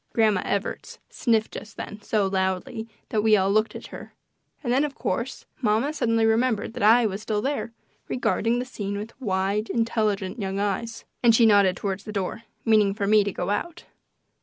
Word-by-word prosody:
Grandma 215 -4 +3
Evarts 200 0 -3
sniffed 225 -3 +1
just 215 - -9
then 210 - -7
so 205 0 +1
loudly 190 +4 -1 0.2
that 215 - +1
we 215 0 +5
all 195 0 +2
looked 215 +1 +1
at - - -7
her, - - -10 0.5
and 240 -2 0
then, 270 +3 +3
of 290 -2 -3
course, 235 +7 -3 0.2
mamma 235 +6 +1
suddenly 230 -6 +1
remembered 225 -1 +1
that - - -6
I 225 +3 +6
was 200 -1 -2
still 215 -1 -1
there, 270 0 -2 0.4
regarding 240 -1 0
the 250 - -2
scene 200 -5 -4
with 215 +3 -6
wide, 200 0 0
intelligent 215 -3 0
young 195 -1 -2
eyes, 205 +3 -2 0.2
and 230 -2 +6
she 230 - +5
nodded 200 -4 +5
toward 195 -2 -2
the 215 +1 -8
door, 200 +1 -3 0.2
meaning 210 -3 +4
for 205 -2 -1
me 210 +1 +5
to 200 - -2
go 180 +1 -3
out. 345 +11 -3
215 Hz, 185 wpm, -25 LUFS, 200-230 Hz, 0.5 s, I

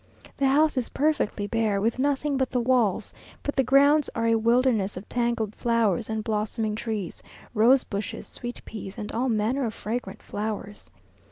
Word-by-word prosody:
The 275 - +2
house 295 +2 +3
is 250 - -1
perfectly 275 -8 0
bare, 215 -1 0
with 225 +5 0
nothing 285 +1 +1
but 265 -1 0
the 250 - 0
walls; 235 -5 +1 0.3
but 285 - -2
the 270 - +4
grounds 280 +3 +4
are 230 - 0
a 230 - +4
wilderness 225 -3 +2
of 190 - -8
tangled 235 -3 -1
flowers 230 -2 +1
and 220 -1 -2
blossoming 215 0 -1
trees, 215 -4 -4 0.3
rose 245 +4 +5
bushes, 200 +1 -5
sweet 240 0 -8
peas, 205 -3 -8
and 210 - -5
all 250 +3 0
manner 230 +5 +1
of 225 -3 -3
fragrant 215 -3 -5
flowers. 210 -1 -5
230 Hz, 170 wpm, -26 LUFS, 215-260 Hz, 0.3 s, rose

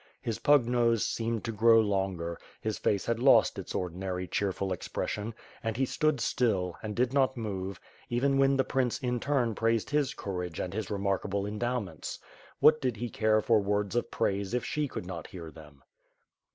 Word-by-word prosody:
His 115 -2 -3
pug 145 -4 +5
nose 120 -2 +2
seemed 115 -1 -2
to 115 - -2
grow 115 +1 +5
longer, 95 -5 -1 0.2
his 110 -1 -3
face 100 -2 +1
had 115 -1 0
lost 135 +2 +5
its - - -6
ordinary 90 +1 -3
cheerful 95 -1 -1
expression, 105 +4 -4 0.3
and 110 0 -2
he 135 - +2
stood 155 +1 +1
still, 100 -7 0
and 105 -2 -5
did 125 +1 +1
not 135 -2 +2
move, 95 -4 -4 0.3
even 135 +3 +2
when 135 0 +4
the 135 - +3
prince 130 -3 0
in 125 -3 -1
turn 130 -4 +1
praised 115 +2 0
his 145 -2 +1
courage 90 -4 -4
and 90 - -3
his 105 -1 -3
remark 100 -2 0
able 100 0 -1
endowments. 105 - -3 0.4
What 155 0 +6
did 125 -4 -1
he 120 +2 -4
care 110 -1 +3
for 110 0 +4
words 105 +1 -1
of 120 - 0
praise 100 +2 -1
if 125 - -1
she 150 -1 -1
could 110 - -6
not 95 - -6
hear 85 -3 -9
them? 75 -4 -15
110 Hz, 185 wpm, -30 LUFS, 95-120 Hz, 0.4 s, What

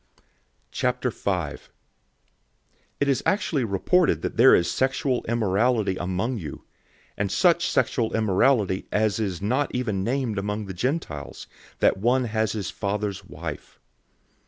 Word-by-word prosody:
005:001 - - -1 1.4
It 140 - +1
is 135 -2 +2
actually 170 -9 +1
reported 125 - +2
that - - -3
there 120 +4 +7
is 85 - +1
sexual 130 -1 0
immorality 110 -1 +1
among 95 +7 -2
you, 75 -6 -8 0.5
and 100 -1 -2
such 170 - +3
sexual 125 -3 0
immorality 105 -1 +2
as 110 0 +1
is 95 -4 -3
not 130 +7 +1
even 105 -7 -1
named 120 -2 -1
among 105 +1 -3
the 95 - -6
Gentiles, 90 - -3 0.4
that - - +4
one 125 +6 +2
has 110 -2 -1
his 100 -6 -3
father's 100 -1 -3
wife. - - -8
110 Hz, 125 wpm, -25 LUFS, 100-130 Hz, 1.4 s, there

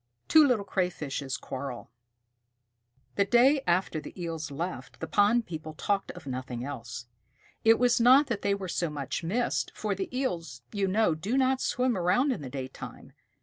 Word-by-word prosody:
TWO 310 -2 +7
LITTLE 225 -6 +1
CRAYFISHES 150 - -2
QUARREL 130 -4 -6 1.3
The 200 - +4
day 260 +6 +5
after 175 -2 +1
the - - -11
Eels 165 -3 -4
left, 165 +6 -5
the - - -3
pond 220 +3 +3
people 155 -2 -7
talked 200 +4 -1
of 180 -3 -12
nothing 130 -2 -4
else. 125 -3 -6 0.6
It 225 0 +6
was 245 -1 +3
not 260 +5 +7
that 230 -6 -3
they 200 0 +1
were 195 -2 -5
so 175 -1 -1
much 140 0 -4
missed, 225 +9 0
for 210 -2 -1
the 190 0 -4
Eels, 170 - -3
you 200 -2 0
know, 200 -2 +3
do 195 +11 -2
not 265 0 +2
swim 250 -1 +1
around 185 +10 +2
in 245 - -3
the 135 - -6
daytime. 130 0 -8
185 Hz, 170 wpm, -28 LUFS, 145-235 Hz, 1.3 s, TWO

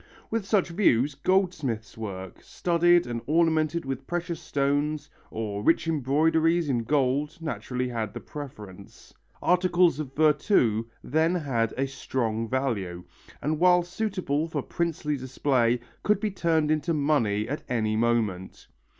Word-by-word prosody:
With 225 -3 -1
such 195 -4 +2
views, 145 - +2
goldsmiths' 155 - 0
work, 95 -4 -7
studded 175 0 +2
and 120 -1 -4
ornamented 160 0 +2
with 135 0 -5
precious 175 -1 -3
stones, 145 +1 -1 0.2
or 105 -2 -4
rich 165 +7 +2
embroideries 160 +3 +2
in 120 -3 +1
gold, 145 +2 +1
naturally 125 -5 -3
had 110 -4 -3
the - - -4
preference. 105 -10 -10 0.3
Articles 180 -3 +3
of 135 -3 -6
virtu 145 - +3 0.2
then 160 +5 +1
had 120 -9 0
a 135 - +1
solid 115 -4 -2
value, 105 -10 -2 0.4
and 150 +1 0
while 180 0 +5
suitable 175 -5 -2
for 150 -4 -3
princely 155 -3 -2
display, 130 -2 +1 0.2
could 210 -2 +2
be 210 0 -1
turned 160 -4 +1
into 155 +1 0
money 120 -9 +1
at 145 +4 -3
any 110 -3 0
moment. 110 -5 -1
145 Hz, 135 wpm, -26 LUFS, 120-165 Hz, 0.4 s, while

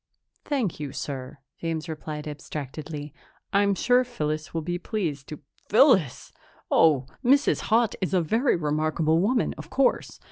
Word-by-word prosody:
"Thank 250 - -1
you, 145 -3 -5
sir," 135 -1 -6 0.2
James 165 0 -3
replied 155 -1 -6
abstractedly. 150 0 -6 0.4
"I'm 200 0 +3
sure 245 +5 +3
Phyllis 155 -10 -3
will 165 -1 -3
be 175 +2 -3
pleased 165 - -3
to 150 - -8
" - - -37
"Phyllis! 210 - +4 0.4
Oh, 145 -5 +4 0.2
Mrs. 275 +3 +4
Haut 225 0 +3
is 190 0 0
a - - +4
very 225 - +2
remarkable 155 +1 +1
woman, 230 +7 +1
of - - -9
course. 270 -1 0
165 Hz, 145 wpm, -26 LUFS, 150-220 Hz, 0.4 s, Phyllis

